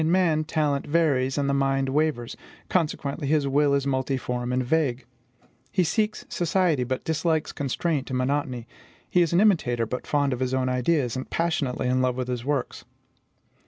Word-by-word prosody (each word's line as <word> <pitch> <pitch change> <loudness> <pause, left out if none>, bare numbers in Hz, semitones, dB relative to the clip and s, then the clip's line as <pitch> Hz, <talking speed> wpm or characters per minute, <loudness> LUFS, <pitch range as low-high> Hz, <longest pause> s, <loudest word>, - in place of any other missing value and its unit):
In 160 - +1
man, 165 -4 +2
talent 150 -3 0
varies, 145 -5 +2
and 140 -1 +1
the 140 - +1
mind 135 -1 +1
wavers; 140 -4 0 0.3
consequently, 150 -4 -1
his 145 -1 +2
will 140 +1 +3
is 140 -1 0
multiform 130 -2 -1
and 125 0 0
vague. 135 -3 0 0.7
He 185 - +2
seeks 210 +6 -1
society, 170 -5 +1
but 130 +1 -3
dislikes 160 0 0
constraint 145 +1 -2
and 130 - -1
monotony; 125 -2 -1 0.4
he 180 - +3
is 170 - +2
an 170 - +3
imitator, 155 - +3
but 125 +3 -5
fond 145 -2 +1
of 125 - -4
his 130 0 0
own 130 -1 0
ideas, 125 0 +1
and 130 - -5
passionately 155 -7 -1
in 130 +1 +2
love 130 -1 +1
with 125 0 -3
his 125 -2 -3
works. 140 -1 -2
140 Hz, 175 wpm, -25 LUFS, 130-160 Hz, 0.7 s, will